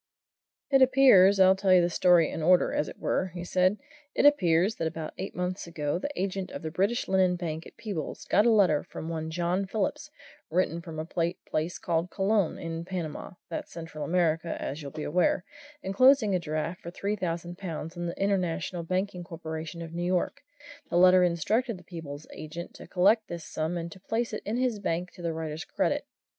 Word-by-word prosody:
"It 270 -1 +5
appears 250 -8 +6
I'll 190 0 +7
tell 190 0 +1
you 185 - +8
the 170 - +2
story 175 -2 +4
in - - -4
order, 180 +3 +4
as 150 - 0
it - - -11
were," 190 - 0
he 175 - -4
said 185 +3 +2 0.4
"it - - +3
appears 190 - +4
that 165 - -1
about 160 -1 -5
eight 190 - -5
months 180 0 -3
ago 150 -1 -2
the 285 - -3
agent 190 0 -2
of - - -7
the 160 - -4
British 200 +9 0
Linen 190 -1 +3
Bank 165 -2 -4
at - - -17
Peebles 200 -9 -5
got 205 +5 +3
a - - +6
letter 190 -9 +4
from 160 - -7
one 160 -1 -3
John 175 +3 -1
Phillips, 260 +10 -2 0.4
written 170 -1 0
from 165 -2 -8
a 155 - -3
place 170 -1 -2
called 170 +1 -1
Colon, 195 0 +1
in 165 0 -5
Panama 175 -3 -5
that's 165 - -6
Central 165 -2 -7
America, 165 0 0
as 145 +3 -4
you'll 140 - -6
be 150 +2 -6
aware 180 +3 +2 0.4
enclosing 220 +2 +4
a 185 - +2
draft 160 +2 -3
for 170 - -7
three 200 +4 -2
thousand 175 -2 -4
pounds 165 -2 -5
on 175 0 -3
the 170 - -6
International 185 -3 0
Banking 185 +1 -2
Corporation 165 0 -6
of 165 0 -9
New 170 - -3
York. 180 0 0 0.5
The - - +1
letter 185 0 +7
instructed 205 - +1
the 180 - -15
Peebles 155 -4 -8
agent 160 +3 -7
to - - -12
collect 205 +4 +3
this 170 -2 -6
sum 160 +3 -2
and 170 0 -5
to 190 - -11
place 225 +4 -2
it 215 - -3
in 220 +3 -1
his 250 -4 0
bank 180 -2 -2
to - - -13
the 170 -1 -1
writer's 160 0 -4
credit. - - -1
175 Hz, 200 wpm, -28 LUFS, 165-195 Hz, 0.5 s, you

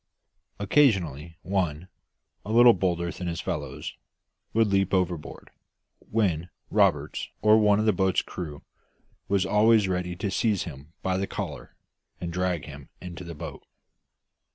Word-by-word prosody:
Occasionally 90 - +2
one, 90 -3 -1 0.6
a 105 - -5
little 120 +1 +8
bolder 85 -3 -1
than 90 - -6
his 85 -1 -3
fellows, - - -4 0.6
would 115 0 +3
leap 95 -2 +2
overboard, 90 -4 -3 0.5
when 90 -6 -1 0.2
Roberts - - +1
or 110 +1 +6
one 105 -1 +4
of 110 - +1
the 110 - +4
boat's 95 -2 +1
crew 75 -5 -7 0.6
was 100 -1 +2
always 105 0 +4
ready 90 -1 -2
to 95 +2 -3
seize 105 -1 +1
him 75 -1 -10
by 95 -1 0
the 95 +1 -1
collar - - -6 0.4
and 85 -1 -5
drag 90 -5 -1
him 70 -2 -11
into 90 0 -8
the 85 -1 -8
boat. 80 +2 -8
90 Hz, 140 wpm, -26 LUFS, 85-100 Hz, 0.6 s, little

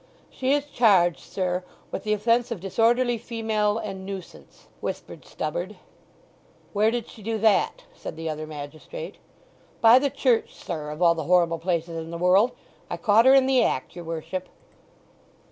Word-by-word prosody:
"She 265 +1 0
is 290 0 +1
charged, 195 - +3
sir, 180 -1 -2 0.3
with - - -5
the 210 - +2
offence 230 +3 +2
of 230 -5 -4
disorderly 235 +5 +2
female 220 -2 -1
and 195 -4 -5
nuisance," 190 -2 -9
whispered - - -6
Stubberd. - - -4 1.0
"Where 210 +1 +3
did 235 0 -3
she 220 - -13
do 225 +2 -2
that?" 215 -2 +2
said - - -8
the 165 0 -5
other 155 0 -4
magistrate. 155 - -8 0.6
"By 230 +2 +7
the 280 +1 +1
church, 260 -4 +1
sir, 155 -4 -5
of 150 +4 -3
all 170 -1 +6
the 160 -3 -5
horrible 170 -1 +3
places 170 -1 -2
in 160 0 -7
the 170 - -5
world!—I 190 +1 0
caught 210 +7 +4
her 265 - +8
in 270 -1 +5
the 260 -2 +4
act, 130 - -2
your 175 - -7
worship." 165 +3 -5
205 Hz, 160 wpm, -25 LUFS, 170-235 Hz, 1.0 s, her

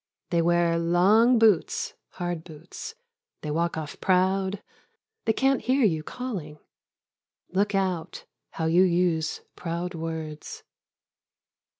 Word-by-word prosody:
They 170 -1 +3
wear 170 0 +2
long 200 +9 +4
boots, 440 - +3 0.2
hard 175 -2 -3
boots; 170 - -9 0.5
they 150 - -4
walk 170 +2 0
off 150 -2 -6
proud; 190 +1 +1 0.6
they 225 - +4
can't 270 +3 +2
hear 260 0 +2
j 180 -6 +3
ou 155 - -5
calling 180 -7 -6 0.5
— - - -61
Look 200 +2 +1
out 185 -4 -2 0.3
how 160 - -2
you 165 +3 +4
use 175 -3 +1
proud 175 +1 -4
words. 160 -2 -6
175 Hz, 120 wpm, -26 LUFS, 165-205 Hz, 0.6 s, long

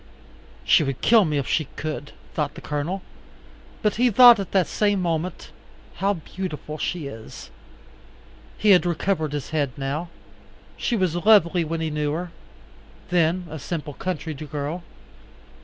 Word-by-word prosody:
She - - +5
would 135 -3 -3
kill 225 -3 +5
me 150 -2 0
if 140 - -2
she 155 - +1
could, 150 -3 -5 0.2
thought - - -2
the - - -8
Colonel; 155 +6 -3 0.8
but 210 -1 +1
he 245 +1 +4
thought 240 0 +8
at 195 - -5
the 190 -2 +4
same 205 +3 0
moment, 170 0 -3 0.5
how 200 +1 +1
beautiful 155 -2 -6
she 170 -1 -2
is. 110 -5 -9 1.1
He 210 - +4
had 180 - +6
recovered 170 -2 -1
his 145 -1 -5
head 145 -4 0
now. 140 +5 -3 0.7
She 240 - -1
was 185 -6 0
lovely 180 -2 +4
when 165 +1 -3
he 160 -1 -2
knew 150 -1 -1
her, 175 +2 -4 0.8
then 175 +1 +2
a 160 -1 -7
simple 150 0 -5
country 160 0 -4
girl. 150 +3 -5
165 Hz, 150 wpm, -24 LUFS, 150-185 Hz, 1.1 s, thought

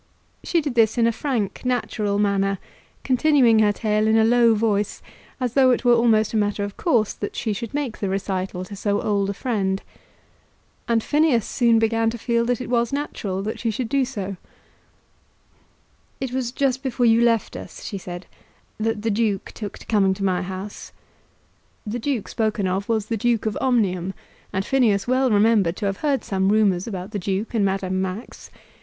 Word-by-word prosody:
She 340 - +1
did 290 -4 -3
this 225 -1 +3
in 235 - +4
a 230 - +3
frank 230 -5 -2
natural 225 -5 -1
manner, 195 -1 +1 0.5
continuing 260 -4 +4
her 210 -1 +4
tale 215 0 0
in 220 +1 +4
a 220 - +5
low 230 0 +4
voice, 210 -1 0 0.4
as 250 -3 -2
though 265 -1 +5
it 250 - +1
were 240 - +6
almost 225 -2 +3
a - - +1
matter 205 -1 0
of 200 0 -5
course 235 - +1
that 205 - -6
she 220 -3 -1
should 230 +2 -5
make 280 -6 -3
the 200 - -2
recital 190 -1 -3
to 200 - -9
so 205 +1 0
old 200 -2 0
a 200 - -3
friend. 195 -5 -1 1.0
And 230 -2 +2
Phineas 295 -7 +2
soon 235 -2 +3
began 225 0 +2
to 235 - -5
feel 235 0 0
that 245 -1 0
it 255 - -5
was 235 -1 +1
natural 205 -9 -3
that 215 - -4
she 230 - -1
should 225 +2 -3
do 275 -1 +2
so. 200 -7 -5 1.8
"It 265 -2 -3
was 255 -2 -1
just 265 -1 0
before 255 -2 0
you 230 0 +5
left 230 -3 +2
us," - - -9
she 200 - -5
said, 175 0 -8 0.5
"that 220 -1 -1
the 225 - +1
Duke 205 -2 -1
took 205 -3 -7
to - - -14
coming 195 -3 +2
to 195 - -5
my 185 -2 +1
house." 190 +2 -7 0.9
The 220 +3 -3
duke 245 -3 -2
spoken 215 -3 -1
of 190 +3 -2
was 220 -3 +1
the 225 +1 -2
Duke 230 +1 +1
of 215 - -1
Omnium, 195 -7 +1 0.4
and 190 +1 -2
Phineas 235 -7 +2
well 255 +1 +2
remembered 205 -4 +3
to 210 - -3
have 195 -1 -1
heard 285 0 0
some 190 -1 0
rumours 200 -3 +2
about 190 -2 -5
the 205 - -3
Duke 195 +5 -2
and 220 -3 +2
Madame 190 -1 0
Max. 190 +5 -6
220 Hz, 190 wpm, -23 LUFS, 200-240 Hz, 1.8 s, were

